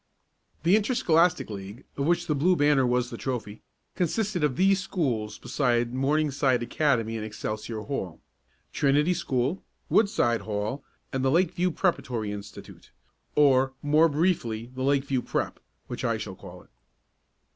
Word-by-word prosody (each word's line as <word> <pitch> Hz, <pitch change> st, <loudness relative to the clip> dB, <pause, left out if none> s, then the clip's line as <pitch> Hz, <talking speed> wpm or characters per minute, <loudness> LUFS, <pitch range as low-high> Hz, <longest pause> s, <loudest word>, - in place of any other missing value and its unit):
The 175 Hz, +5 st, +5 dB
Interscholastic 180 Hz, -6 st, +2 dB
League, 100 Hz, +5 st, -8 dB
of 140 Hz, +1 st, -1 dB
which 175 Hz, 0 st, +2 dB
the 150 Hz, -, 0 dB
Blue 170 Hz, +6 st, +3 dB
Banner 145 Hz, -4 st, +3 dB
was 125 Hz, 0 st, 0 dB
the 115 Hz, -, -6 dB
trophy, 115 Hz, -5 st, -4 dB, 0.3 s
consisted 185 Hz, 0 st, -1 dB
of 145 Hz, -4 st, +1 dB
these 195 Hz, +3 st, +3 dB
schools 120 Hz, -, -2 dB
beside 120 Hz, -3 st, 0 dB
Morningside 135 Hz, -2 st, +1 dB
Academy 120 Hz, -3 st, 0 dB
and 110 Hz, -, -4 dB
Excelsior 110 Hz, +1 st, -5 dB
Hall: 95 Hz, -, -5 dB, 0.5 s
Trinity 150 Hz, +5 st, +3 dB
School, 140 Hz, -1 st, -1 dB, 0.3 s
Woodside 120 Hz, -, +2 dB
Hall 110 Hz, +6 st, -3 dB, 0.3 s
and 130 Hz, 0 st, -1 dB
the 135 Hz, -, +3 dB
Lakeview 180 Hz, +3 st, +2 dB
Preparatory 125 Hz, -, -1 dB
Institute 100 Hz, 0 st, -10 dB, 0.5 s
or, 135 Hz, -2 st, +4 dB
more 155 Hz, +3 st, +4 dB
briefly 135 Hz, -8 st, -1 dB
the 130 Hz, -, -6 dB
Lakeview 135 Hz, -1 st, +1 dB
Prep., -, -, -3 dB, 0.3 s
which -, -, -6 dB
I -, -, +1 dB
shall -, -, -6 dB
call -, -, -12 dB
it. -, -, -28 dB
135 Hz, 140 wpm, -27 LUFS, 120-165 Hz, 0.5 s, The